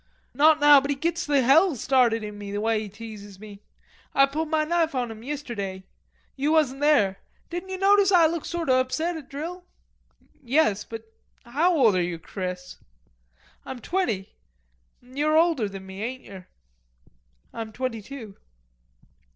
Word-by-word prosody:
"Not 305 +4 +5
now, 290 -1 +7
but 280 - -5
he 285 - +1
gits 335 +4 -2
the 285 -3 +3
hell 315 +6 +5
started 240 -2 +2
in 210 0 -6
me, 205 -1 -8
the 205 - -2
way 220 0 +1
he 215 -1 -6
teases 205 -2 -11
me. 205 -1 -12 0.5
Ah 275 - +6
pulled 305 +3 -3
ma 310 -1 +2
knife 330 -2 0
on 245 -3 -1
him 220 0 -10
yisterday. 230 -9 -5 0.5
You 285 +3 0
wasn't 290 -4 +2
there. 245 -11 +3 0.3
Didn't 350 +2 -5
ye 375 - -4
notice 395 0 +4
Ah 350 -3 +6
looked 330 0 -1
sort 340 -1 -3
o' 255 -1 +4
upsot 320 +7 -1
at 300 -4 -9
drill?" 335 +6 -6 0.8
"Yes... 250 -5 +1
but 225 -1 -8 0.4
how 320 +9 +1
old 230 -8 +4
are 180 - +2
you, 175 -1 -2
Chris!" 180 +1 -6 0.9
"Ah'm 265 - -7
twenty. 245 - -2 0.7
You're 290 +5 0
older 320 -11 +2
than 195 -1 -9
me, 190 +1 -9
ain't 255 +3 -5
yer?" 190 -2 -12 1.1
"I'm 225 -1 -6
twenty 235 -1 -4
two." 225 -4 -10
260 Hz, 165 wpm, -25 LUFS, 215-315 Hz, 1.1 s, now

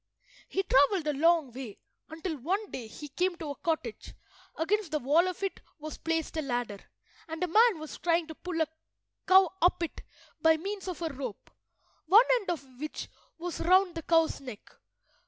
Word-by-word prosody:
He 385 - 0
travelled 305 +3 +4
a 300 - +1
long 320 -1 +3
way, 245 -4 -8 0.3
until 320 +1 -4
one 385 - -2
day 235 -3 -6
he 295 +6 -9
came 360 +6 0
to 315 -3 -5
a - - -6
cottage, 310 -9 -3 0.4
against 395 +3 0
the 305 - 0
wall 300 +6 +3
of 365 +1 -5
it 390 - -3 0.2
was 310 0 -8
placed 325 -1 -2
a - - +1
ladder, 245 -7 -3 0.5
and 325 +2 -4
a - - +1
man 440 +3 +5
was 310 0 -8
trying 335 -1 +2
to 320 - -8
pull 355 +1 -5
a 320 - +2 0.6
cow 375 -2 +7
up 350 0 +3
it 335 - -5 0.4
by 320 0 +5
means 390 +3 -5
of 355 -2 -4
a 325 - 0
rope, 255 -6 -7 0.6
one 425 +8 +8
end 410 - -8
of 270 -7 -5
which 305 +1 -5 0.3
was 345 +1 -5
round 370 +1 +4
the 330 - -5
cow's 325 -2 +2
neck. 250 -6 -10
325 Hz, 185 wpm, -29 LUFS, 290-360 Hz, 0.6 s, one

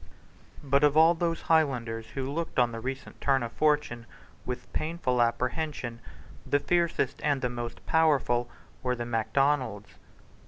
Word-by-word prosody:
But 140 0 +2
of 150 0 +4
all 160 +2 +7
those 165 -1 -2
Highlanders 120 -8 +1
who 135 -1 -2
looked 165 +2 -4
on 120 -2 +3
the 115 - -5
recent 130 +3 -6
turn 135 -2 +2
of 115 - -4
fortune 145 -7 0 0.4
with 125 0 -6
painful 155 -6 0
apprehension 125 0 -1 0.4
the 145 - +2
fiercest 170 -5 0
and 145 -3 +1
the 125 - +1
most 120 -1 -6
powerful 135 -7 +2 0.3
were 125 -1 0
the 120 -1 -4
Macdonalds. 115 -1 0
130 Hz, 145 wpm, -28 LUFS, 120-150 Hz, 0.4 s, all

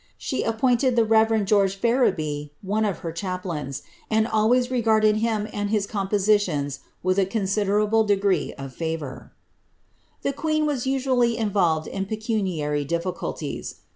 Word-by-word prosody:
She 260 - -2
appointed 245 +2 +2
the 230 -2 +4
reverend 220 -1 +3
Geoige 200 -2 +3
Fereby 180 - +1
one 210 +3 0
of 195 -5 -1
her 165 - -2
chaplains, 170 -6 -4 0.3
and 220 0 +3
always 240 +3 +2
regardMl 220 -3 +3
him 215 -1 0
and 205 0 -2
his 210 -2 +1
compositions 195 -8 0 0.2
with 185 +2 +2
a 195 - +3
considerable 210 +2 +1
degree 200 -2 +1
of 135 -2 -8
&vour.' 160 -5 -5 0.9
The 275 - 0
queen 310 +1 0
was 275 -4 -1
usually 255 -3 +1
involved 185 -8 +1
in 195 +3 -4
pecuniary 190 -10 -1
difficulties. 170 +5 -4
205 Hz, 135 wpm, -24 LUFS, 180-225 Hz, 0.9 s, the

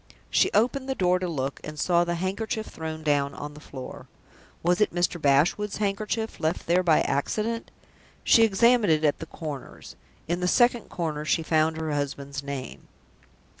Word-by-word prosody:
She - - +4
opened 260 +5 +1
the 265 - 0
door 180 -3 +2
to 180 - -2
look, 140 -5 -3
and 155 0 -7
saw 175 +2 +3
the 175 0 -2
handkerchief 205 +5 -2
thrown 160 0 -6
down 145 -2 +1
on 145 0 -7
the 150 - -12
floor. 135 -4 -9 0.6
Was 175 +3 +2
it 210 - +3
Mr. 175 -1 0
Bashwood's 155 +9 +2
handkerchief, 215 +2 -2
left 160 0 -1
there 175 +2 +3
by 165 -4 +4
accident? 215 +11 -1 0.5
She 230 - +6
examined 225 -1 +4
it 155 0 +2
at 150 -2 +2
the 165 - -7
corners. 150 -5 -8 0.3
In 175 +1 -1
the 180 - 0
second 240 +3 +3
corner 155 -4 -3
she 160 +1 +1
found 160 0 +2
her 160 -1 -3
husband's 140 -1 -3
name! 140 -2 -7
170 Hz, 170 wpm, -26 LUFS, 150-205 Hz, 0.6 s, She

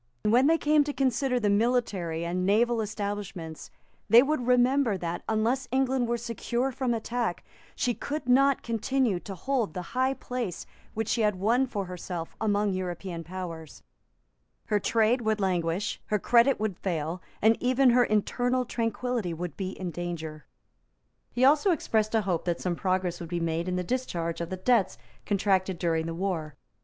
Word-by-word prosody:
When 240 +6 +4
they 330 +1 +4
came 300 -1 +3
to 290 - -3
consider 260 -1 +1
the 215 - 0
military 200 -7 0
and 180 +2 -1
naval 225 +4 +3
establishments, 200 -6 -5 0.4
they 235 +2 +8
would 275 -4 -1
remember 250 -2 +3
that, 170 -1 -4
unless 230 +4 +1
England 260 -1 +1
were 235 0 0
secure 240 +2 -2
from 255 -1 -1
attack, 230 -3 -2 0.3
she 245 - 0
could 290 +2 -5
not 275 +2 +4
continue 230 -2 0
to 195 +2 -8
hold 240 +1 -1
the 180 - -3
high 260 +1 +1
place 245 -7 -4 0.3
which 225 0 -2
she 230 - +1
had 210 -2 +2
won 230 +8 +2
for 205 -5 -3
herself 180 -2 -6
among 205 -2 +1
European 180 -2 -4
powers; 165 -3 -7 0.9
her 210 - +3
trade 225 +4 +2
would 220 -1 0
languish; 180 -1 -1
her 210 - +1
credit 235 +5 +4
would 210 -4 -2
fail; 170 -1 -2 0.2
and 220 +2 +5
even 255 +1 +4
her 245 +1 +5
internal 245 +4 +1
tranquillity 230 -5 -2
would 175 -2 -5
be 190 -2 -3
in 180 -2 -3
danger. 160 -4 -6 0.8
He 245 +2 +2
also 295 +7 +5
expressed 225 - +1
a 220 - +4
hope 180 -5 -1
that 175 -1 -1
some 180 -2 -1
progress 185 -1 -1
would 170 - -7
be 175 0 -2
made 165 +1 -1
in 180 - -1
the 180 - -1
discharge 175 -8 -2
of 170 - -4
the 185 - -4
debts 200 -1 +2 0.3
contracted 190 -2 +1
during 165 -2 0
the 165 - -4
War. 165 -5 -3
210 Hz, 170 wpm, -28 LUFS, 180-245 Hz, 0.9 s, they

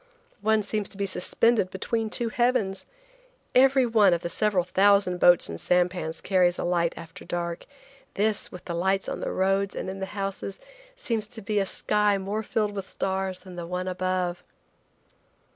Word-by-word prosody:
One 215 0 +2
seems 210 0 -2
to - - -10
be 200 - -1
suspended 195 +2 +1
between 220 +4 -2
two 235 +1 +2
heavens. 240 -5 0 0.7
Every 265 0 +5
one 210 -6 +4
of 170 - -5
the 170 - -4
several 200 -1 +1
thousand 195 0 +3
boats 175 0 +6
and 85 0 -6
sampans 180 -2 0
carries 180 -2 +2
a - - -3
light 175 -1 +1
after 165 -1 -10
dark. 170 -1 -4 0.5
This, 210 +1 0
with 180 - -10
the 170 - -4
lights 190 +3 0
on - - -4
the - - -3
roads 195 +1 0
and 190 - -4
in 195 - -8
the 190 - -3
houses, 195 0 -4 0.4
seems 230 - -2
to 225 0 -9
be 210 0 0
a 195 - 0
sky 210 0 +1
more 200 +3 -3
filled 210 -1 -1
with 195 -2 -6
stars 190 -1 -2
than 185 -2 -11
the 170 -1 -5
one 180 +1 -3
above. 185 -1 -2
195 Hz, 175 wpm, -26 LUFS, 180-210 Hz, 0.7 s, boats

